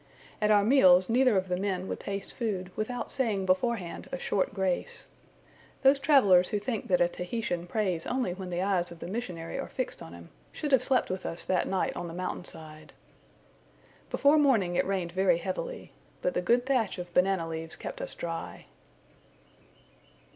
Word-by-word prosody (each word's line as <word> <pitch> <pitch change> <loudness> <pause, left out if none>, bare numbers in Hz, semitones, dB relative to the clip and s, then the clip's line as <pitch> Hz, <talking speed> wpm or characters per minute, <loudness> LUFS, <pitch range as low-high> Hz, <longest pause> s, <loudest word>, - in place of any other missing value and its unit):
At 210 - +3
our 205 -1 +5
meals 185 -6 +6
neither 250 -2 +4
of 190 0 0
the 180 -1 -1
men 190 -1 -2
would - - -4
taste 195 0 -5
food, 190 -6 -3
without 245 +3 -3
saying 220 -8 0
beforehand 185 0 -1
a 270 - -2
short 195 -6 0
grace. 190 -3 -2 0.8
Those 275 +1 +6
travellers 205 -12 +5
who 210 - 0
think 220 +1 -3
that 180 -1 +2
a 175 - +5
Tahitian 180 -1 -4
prays 185 -5 -1
only 250 -8 -1
when 185 0 -7
the 175 +1 -1
eyes 190 -3 +1
of 170 - -10
the - - -8
missionary 185 -2 -5
are 275 - -4
fixed 255 - -4
on 80 - -9
him, 85 -1 -12 0.2
should 295 -2 -4
have 265 -3 +5
slept 255 -5 +1
with 185 0 -4
us 165 - -4
that 185 -1 +1
night 190 -1 -1
on 175 - -4
the 165 - -7
mountain 180 0 -4
side. 155 -1 -9 1.2
Before 290 +2 +4
morning 220 -12 +3
it - - +1
rained 185 -3 -1
very 185 -1 +3
heavily; 190 - -5 0.3
but - - +1
the - - 0
good 245 +1 +2
thatch 250 -8 +1
of 175 -1 -7
banana 180 -2 +2
leaves 160 0 -5
kept - - -7
us - - -5
dry. 165 -1 -6
190 Hz, 185 wpm, -29 LUFS, 175-240 Hz, 1.2 s, meals